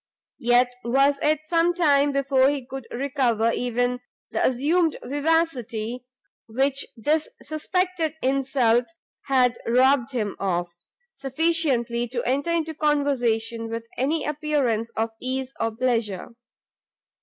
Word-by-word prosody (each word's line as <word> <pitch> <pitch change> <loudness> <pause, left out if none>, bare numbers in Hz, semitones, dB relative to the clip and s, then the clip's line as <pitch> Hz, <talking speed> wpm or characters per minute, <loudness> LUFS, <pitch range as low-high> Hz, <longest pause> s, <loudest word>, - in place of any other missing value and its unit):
Yet 245 +1 +3
was 275 +4 +3
it 305 0 +2
some 335 +2 +2
time 290 -4 +3
before 275 -1 +3
he 280 -3 -3
could 265 -1 -8
recover 245 -4 0
even 245 +1 -1 0.3
the - - -1
assumed 310 +6 +2
vivacity 255 -6 -1 0.4
which 270 +4 0
this 300 +7 0
suspected 325 +1 -1
insult 255 -3 +2 0.4
had 255 -3 +2
robbed 255 +2 +3
him 215 -6 -2
of, 175 -3 -1 0.4
sufficiently 270 -5 0
to 240 0 -3
enter 280 +6 0
into 325 -1 0
conversation 245 -7 0
with 230 0 -5
any 295 +6 0
appearance 285 -7 0
of 225 +1 0
ease 260 +1 -3
or 225 - +1
pleasure. 225 -4 -1
265 Hz, 115 wpm, -24 LUFS, 235-295 Hz, 0.4 s, Yet